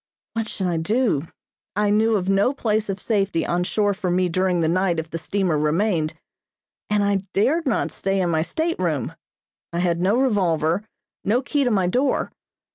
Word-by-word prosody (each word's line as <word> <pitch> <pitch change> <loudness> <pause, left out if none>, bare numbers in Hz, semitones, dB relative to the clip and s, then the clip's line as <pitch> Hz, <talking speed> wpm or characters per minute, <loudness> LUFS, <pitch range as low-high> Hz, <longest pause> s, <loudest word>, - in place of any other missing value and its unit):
What 225 -1 -2
should 190 - -3
I 175 -2 0
do! 185 - +1 0.5
I 205 0 +2
knew 220 +1 +3
of 190 -3 -1
no 195 +7 +3
place 215 -4 0
of 195 0 -2
safety 195 -5 0
on 175 +1 0
shore 205 +2 +1
for 190 -2 -3
me 180 +1 +2
during 185 +1 +1
the 160 - +2
night 180 +1 +1
if 160 0 -4
the 165 - -3
steamer 180 -3 0
remained, 160 +1 +1 0.7
and 210 -1 +2
I 200 -1 0
dared 285 +10 +2
not 240 - 0
stay 195 0 -1
in 175 -2 +1
my 160 -1 +2
stateroom. 175 - -1 0.6
I 170 - -4
had 175 -1 +1
no 195 +6 +3
revolver, 180 - +1 0.4
no 235 +6 +1
key 285 +1 0
to - - +2
my 195 -5 +2
door. 255 +10 +1
195 Hz, 185 wpm, -23 LUFS, 170-215 Hz, 0.7 s, knew